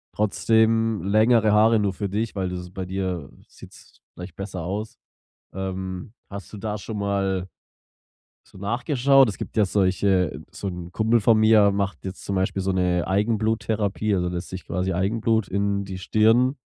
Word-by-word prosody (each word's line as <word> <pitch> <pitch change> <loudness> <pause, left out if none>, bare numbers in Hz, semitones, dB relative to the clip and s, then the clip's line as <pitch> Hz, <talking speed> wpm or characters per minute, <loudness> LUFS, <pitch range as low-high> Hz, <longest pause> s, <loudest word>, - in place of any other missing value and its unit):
trotzdem 110 0 +2
längere 110 +2 +4
Haare 110 +1 +5
nur 100 -2 0
für 100 +1 -4
dich, 110 +2 -2
weil 95 -2 -2
das 90 -1 -6
bei 95 +1 -6
dir 90 -5 -3 0.2
sieht's - - -16
vielleicht 90 -1 -10
besser 95 -3 -6
aus. 105 +5 -5 0.6
Ähm, 95 +1 -5 0.2
hast 100 -1 -9
du 105 - -7
da 105 0 -3
schon 105 +2 -6
mal 95 -2 -1 1.0
so - - -18
nachgeschaut? 130 +6 +3
Es 105 - -4
gibt - - -7
ja 105 - +5
solche 95 -2 +1
so 100 - -6
'n 90 -1 -6
Kumpel 115 +2 +2
von 110 +1 +4
mir 110 -2 +5
macht 100 0 -2
jetzt 95 0 -7
zum 100 - -2
Beispiel 95 +1 0
so 95 - 0
'ne 90 -2 +1
Eigenbluttherapie, 110 0 0
also 90 -1 0
lässt 90 0 -5
sich 95 -1 -7
quasi 90 +1 -2
Eigenblut 110 +4 0
in 100 +1 0
die 95 -1 -6
Stirn 115 +7 +3
100 Hz, 165 wpm, -24 LUFS, 95-110 Hz, 1.0 s, Haare